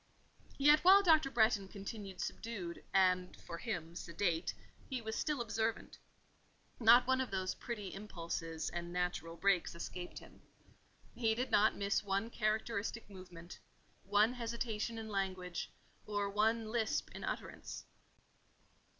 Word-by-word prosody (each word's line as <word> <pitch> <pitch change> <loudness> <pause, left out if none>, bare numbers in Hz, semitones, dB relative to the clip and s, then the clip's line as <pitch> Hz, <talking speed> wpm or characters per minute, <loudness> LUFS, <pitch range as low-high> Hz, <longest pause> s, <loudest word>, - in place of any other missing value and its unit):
Yet 295 +2 +7
while 390 +4 +7
Dr. 315 -6 +5
Bretton 220 -5 +3
continued 195 -1 -7
subdued, 190 -7 -5
and, 185 -1 +3
for 170 - -7
him, 175 -8 -4
sedate, 170 -1 -1 0.4
he 260 -2 -2
was 220 -1 -4
still 300 -3 -1
observant. 225 -1 -2 0.8
Not 240 +1 +7
one 260 +1 +2
of 260 - -2
those 185 -1 -1
petty 210 -5 -6
impulses 170 -5 -4
and 175 0 -4
natural 175 -2 -2
breaks 195 -3 +2
escaped 175 +1 -6
him. - - -12 0.7
He 225 -2 +1
did 250 +3 -2
not 210 +1 +5
miss 200 +1 0
one 200 +3 -1
characteristic 220 0 -1
movement, 175 -2 -11 0.4
one 205 +4 +3
hesitation 230 -1 -3
in 220 -1 -5
language, 185 -3 -3 0.4
or 205 -1 -1
one 220 +2 +1
lisp 225 -2 0
in - - -8
utterance. - - -5
205 Hz, 130 wpm, -35 LUFS, 185-230 Hz, 0.8 s, Yet